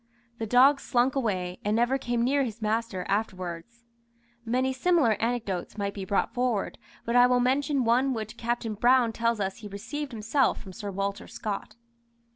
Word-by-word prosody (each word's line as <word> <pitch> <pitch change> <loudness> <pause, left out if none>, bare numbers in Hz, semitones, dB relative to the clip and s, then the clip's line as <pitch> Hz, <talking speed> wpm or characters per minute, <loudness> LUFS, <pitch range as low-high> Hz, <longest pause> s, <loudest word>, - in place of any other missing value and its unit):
The 225 - -3
dog 265 +5 +6
slunk 250 +1 +1
away, 185 -8 -1
and 210 +1 +1
never 240 +4 +2
came 240 -2 -1
near 275 +3 +2
his 230 -3 -5
master 215 -3 -1
afterwards. 195 +2 -4 0.6
Many 255 +3 0
similar 295 -2 +3
anecdotes 225 -6 -2
might 200 -1 -2
be 195 -2 -6
brought 195 +1 0
forward, 245 -5 -1 0.3
but 235 - -1
I 245 0 +7
will 250 0 +3
mention 270 +2 +1
one 250 +3 +2
which 220 0 -5
Captain 235 -1 -2
Brown 240 +2 +3
tells 230 0 0
us 195 -1 -2
he 215 - -9
received 235 +9 -6
himself 230 +4 +1
from 190 -3 -11
Sir 205 +3 -6
Walter 200 +1 -3
Scott. 215 0 -5
230 Hz, 170 wpm, -27 LUFS, 205-250 Hz, 0.6 s, I